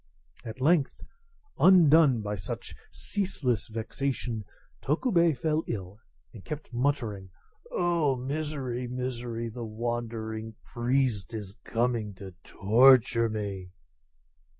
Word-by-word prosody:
At 115 Hz, +2 st, -8 dB
length, 150 Hz, +1 st, +2 dB, 0.6 s
undone 160 Hz, -, +6 dB
by 105 Hz, 0 st, -3 dB
such 95 Hz, -2 st, -6 dB, 0.2 s
ceaseless 140 Hz, -, -2 dB
vexation, 115 Hz, 0 st, -3 dB, 0.4 s
Tokubei 170 Hz, -, +2 dB
fell 155 Hz, +4 st, 0 dB
ill, 100 Hz, -2 st, -5 dB, 0.3 s
and 100 Hz, -, -11 dB
kept 150 Hz, -4 st, -7 dB
muttering, 120 Hz, -7 st, -1 dB, 0.4 s
"Oh, 170 Hz, -6 st, +1 dB
misery! 130 Hz, -2 st, -3 dB
misery! 120 Hz, -2 st, -4 dB
the 115 Hz, +1 st, -6 dB
wandering 110 Hz, -1 st, -4 dB
priest 120 Hz, -3 st, -1 dB
is 100 Hz, -3 st, -6 dB
coming 115 Hz, -3 st, -1 dB
to 95 Hz, 0 st, -10 dB
torture 115 Hz, +2 st, +4 dB
me!" 100 Hz, -4 st, -5 dB
120 Hz, 100 wpm, -28 LUFS, 110-140 Hz, 0.6 s, undone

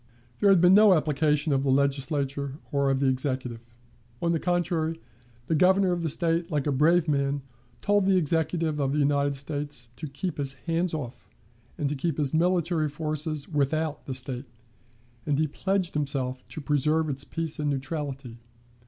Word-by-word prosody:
There 205 Hz, -, +4 dB
had 195 Hz, -2 st, +6 dB
been 180 Hz, +1 st, +6 dB
no 205 Hz, -1 st, +7 dB
application 150 Hz, -1 st, +1 dB
of 135 Hz, -, +2 dB
the 135 Hz, -, 0 dB
Legislature 140 Hz, 0 st, 0 dB, 0.2 s
or 140 Hz, -1 st, +2 dB
of 135 Hz, -1 st, +1 dB
the -, -, +2 dB
Executive. 130 Hz, -3 st, -1 dB, 0.6 s
On 170 Hz, -, 0 dB
the 165 Hz, -, +1 dB
contrary, 170 Hz, -2 st, 0 dB, 0.5 s
the 160 Hz, -, -1 dB
Governor 185 Hz, +3 st, +4 dB
of 175 Hz, -1 st, -1 dB
the 165 Hz, -, -1 dB
State, 165 Hz, +2 st, +1 dB
like 150 Hz, -5 st, -1 dB
a 145 Hz, -, +1 dB
brave 160 Hz, +5 st, +3 dB
man, 140 Hz, -1 st, 0 dB, 0.4 s
told 205 Hz, -1 st, +3 dB
the 190 Hz, -1 st, +4 dB
Executive 160 Hz, -1 st, 0 dB
of 135 Hz, 0 st, 0 dB
the -, -, 0 dB
United 140 Hz, -1 st, +2 dB
States 145 Hz, -3 st, -4 dB
to 155 Hz, -, -5 dB
keep 150 Hz, +5 st, -5 dB
his 140 Hz, -1 st, 0 dB
hands 165 Hz, +6 st, -1 dB
off, 125 Hz, -5 st, -7 dB, 0.5 s
and 145 Hz, -, -1 dB
to 140 Hz, -, -1 dB
keep 150 Hz, +2 st, -2 dB
his 145 Hz, -2 st, 0 dB
military 170 Hz, -2 st, +1 dB
forces 155 Hz, 0 st, -3 dB
without 155 Hz, 0 st, -1 dB
the 130 Hz, -, -3 dB
State, 125 Hz, 0 st, -4 dB, 0.8 s
and 145 Hz, -2 st, +1 dB
he 155 Hz, -, +2 dB
pledged 190 Hz, +4 st, -1 dB
himself 135 Hz, -3 st, -2 dB
to 155 Hz, -, -7 dB
preserve 150 Hz, +3 st, +1 dB
its 140 Hz, -1 st, -2 dB
peace 165 Hz, 0 st, -4 dB
and 150 Hz, -1 st, 0 dB
neutrality. 135 Hz, -3 st, -4 dB
150 Hz, 175 wpm, -27 LUFS, 140-165 Hz, 0.8 s, no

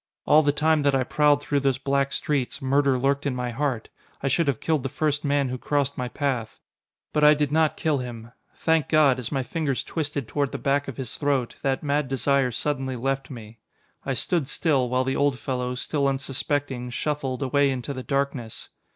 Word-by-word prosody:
All 155 Hz, -, +6 dB
the 145 Hz, -1 st, +2 dB
time 155 Hz, +1 st, +2 dB
that 140 Hz, -1 st, +2 dB
I 130 Hz, -, +2 dB
prowled 145 Hz, +2 st, +3 dB
through 145 Hz, -1 st, +1 dB
those 135 Hz, -1 st, +1 dB
black 140 Hz, 0 st, 0 dB
streets, 140 Hz, -4 st, -1 dB
murder 135 Hz, 0 st, +2 dB
lurked 140 Hz, +2 st, +1 dB
in 130 Hz, -, -1 dB
my 125 Hz, -1 st, -2 dB
heart. 130 Hz, -3 st, -2 dB, 0.3 s
I 135 Hz, -, +1 dB
should 165 Hz, +4 st, +1 dB
have 135 Hz, -5 st, +1 dB
killed 160 Hz, -3 st, 0 dB
the 135 Hz, -, -3 dB
first 150 Hz, +1 st, -1 dB
man 140 Hz, -2 st, +1 dB
who 130 Hz, 0 st, -4 dB
crossed 145 Hz, 0 st, 0 dB
my 125 Hz, -, -3 dB
path. 125 Hz, -4 st, -2 dB, 0.5 s
But 150 Hz, -, +2 dB
I 150 Hz, 0 st, +8 dB
did 145 Hz, -1 st, 0 dB
not 155 Hz, 0 st, +2 dB
kill 155 Hz, -4 st, +1 dB
him. 115 Hz, -2 st, -7 dB, 0.2 s
Thank 160 Hz, -1 st, +1 dB
God, 145 Hz, -5 st, +4 dB
as 120 Hz, -1 st, -5 dB
my 135 Hz, -3 st, 0 dB
fingers 140 Hz, -1 st, -2 dB
twisted 145 Hz, -6 st, -3 dB
toward 140 Hz, +2 st, -1 dB
the -, -, -2 dB
back 140 Hz, +1 st, 0 dB
of 135 Hz, -, -6 dB
his 130 Hz, -4 st, -5 dB
throat, 140 Hz, -4 st, 0 dB
that 135 Hz, 0 st, 0 dB
mad 145 Hz, -1 st, 0 dB
desire 135 Hz, 0 st, +1 dB
suddenly 130 Hz, +1 st, -2 dB
left 135 Hz, +2 st, -2 dB
me. 115 Hz, -4 st, -10 dB, 0.4 s
I 135 Hz, -, -2 dB
stood 150 Hz, +4 st, 0 dB
still, 140 Hz, -8 st, +1 dB
while 125 Hz, +1 st, +1 dB
the 135 Hz, +1 st, -1 dB
old 140 Hz, -2 st, +2 dB
fellow, 125 Hz, +1 st, -3 dB
still 140 Hz, +2 st, -1 dB
unsuspecting, 135 Hz, -1 st, -2 dB
shuffled, 140 Hz, 0 st, -2 dB
away 140 Hz, +2 st, +3 dB
into 130 Hz, +1 st, -3 dB
the 130 Hz, -, -5 dB
darkness. 135 Hz, -4 st, -3 dB
140 Hz, 205 wpm, -25 LUFS, 130-145 Hz, 0.5 s, I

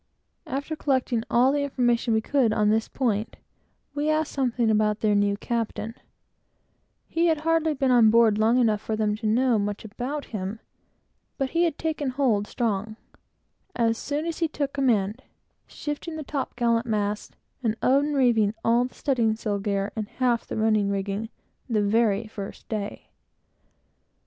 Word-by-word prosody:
After 285 Hz, +4 st, -3 dB
collecting 260 Hz, -5 st, 0 dB
all 250 Hz, +3 st, +4 dB
the 290 Hz, 0 st, 0 dB
information 240 Hz, -4 st, +1 dB
we 220 Hz, -, +2 dB
could 265 Hz, 0 st, +2 dB
get 215 Hz, -, -1 dB
on 210 Hz, -1 st, +3 dB
this 220 Hz, +1 st, +1 dB
point, 225 Hz, -4 st, -1 dB, 0.6 s
we 295 Hz, +1 st, -1 dB
asked 310 Hz, 0 st, +1 dB
something 245 Hz, -4 st, +1 dB
about 210 Hz, 0 st, +1 dB
their 215 Hz, -1 st, +3 dB
new 205 Hz, 0 st, +2 dB
captain. 225 Hz, -1 st, -3 dB, 1.1 s
He 335 Hz, +1 st, +1 dB
had 320 Hz, -2 st, +1 dB
hardly 320 Hz, -1 st, +1 dB
been 265 Hz, -1 st, +1 dB
on 235 Hz, -3 st, +6 dB
board 225 Hz, -2 st, +4 dB
long 225 Hz, +3 st, +4 dB
enough 220 Hz, -4 st, +2 dB
for 220 Hz, -, -2 dB
them 215 Hz, -1 st, 0 dB
to 220 Hz, 0 st, -3 dB
know 240 Hz, +1 st, +3 dB
much 205 Hz, +1 st, -3 dB
about 255 Hz, +7 st, -4 dB
him, 200 Hz, +1 st, -4 dB, 0.8 s
but 270 Hz, -1 st, -1 dB
he 340 Hz, +1 st, +3 dB
had 325 Hz, -3 st, -1 dB
taken 310 Hz, -4 st, -2 dB
hold 250 Hz, -6 st, +1 dB
strong, 215 Hz, -2 st, -2 dB, 0.8 s
as 230 Hz, -1 st, +2 dB
soon 290 Hz, +6 st, -3 dB
as 335 Hz, -1 st, -3 dB
he 330 Hz, -, +2 dB
took 285 Hz, -2 st, -3 dB
command; 235 Hz, -5 st, +1 dB, 0.5 s
sending 295 Hz, +3 st, -5 dB
down -, -, -5 dB
the 310 Hz, -, -5 dB
top 275 Hz, -1 st, -4 dB
gallant 235 Hz, -1 st, +1 dB
masts, 210 Hz, -1 st, -2 dB, 0.3 s
and 225 Hz, -3 st, 0 dB
unreeving 255 Hz, -6 st, +3 dB
half 240 Hz, +2 st, +1 dB, 1.4 s
the -, -, -4 dB
rigging, 205 Hz, -1 st, 0 dB, 0.4 s
the 215 Hz, -3 st, +2 dB
very 215 Hz, 0 st, +2 dB
first 205 Hz, -2 st, -8 dB
day. 210 Hz, -2 st, -5 dB
235 Hz, 150 wpm, -25 LUFS, 215-275 Hz, 1.4 s, on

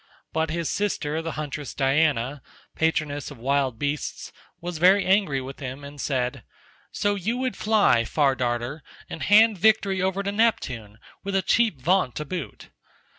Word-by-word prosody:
But 160 Hz, 0 st, 0 dB
his 165 Hz, 0 st, -2 dB
sister 160 Hz, -6 st, -1 dB
the 165 Hz, 0 st, -4 dB
huntress 150 Hz, -2 st, -5 dB
Diana, 140 Hz, -1 st, +1 dB, 0.3 s
patroness 155 Hz, -3 st, -1 dB
of 145 Hz, -, -11 dB
wild 135 Hz, 0 st, 0 dB
beasts, 145 Hz, +3 st, -3 dB, 0.3 s
was 175 Hz, -2 st, -5 dB
very 190 Hz, +4 st, +5 dB
angry 185 Hz, -8 st, +2 dB
with 135 Hz, +1 st, -8 dB
him 135 Hz, +1 st, -6 dB
and 140 Hz, 0 st, -9 dB
said, 125 Hz, -3 st, -2 dB, 0.5 s
"So 205 Hz, 0 st, 0 dB
you 205 Hz, +5 st, -2 dB
would 255 Hz, 0 st, -2 dB
fly, 210 Hz, -, +3 dB
Far 140 Hz, +3 st, +2 dB
Darter, 125 Hz, +3 st, -2 dB, 0.3 s
and 165 Hz, -, -6 dB
hand 215 Hz, 0 st, +5 dB
victory 200 Hz, -2 st, +3 dB
over 190 Hz, +1 st, 0 dB
to 200 Hz, -, -2 dB
Neptune 130 Hz, -, 0 dB, 0.3 s
with 195 Hz, 0 st, -3 dB
a 190 Hz, -, +2 dB
cheap 225 Hz, -, +2 dB
vaunt 175 Hz, -1 st, +1 dB
to 150 Hz, -, -4 dB
boot. 170 Hz, -2 st, -7 dB
155 Hz, 160 wpm, -25 LUFS, 135-195 Hz, 0.5 s, very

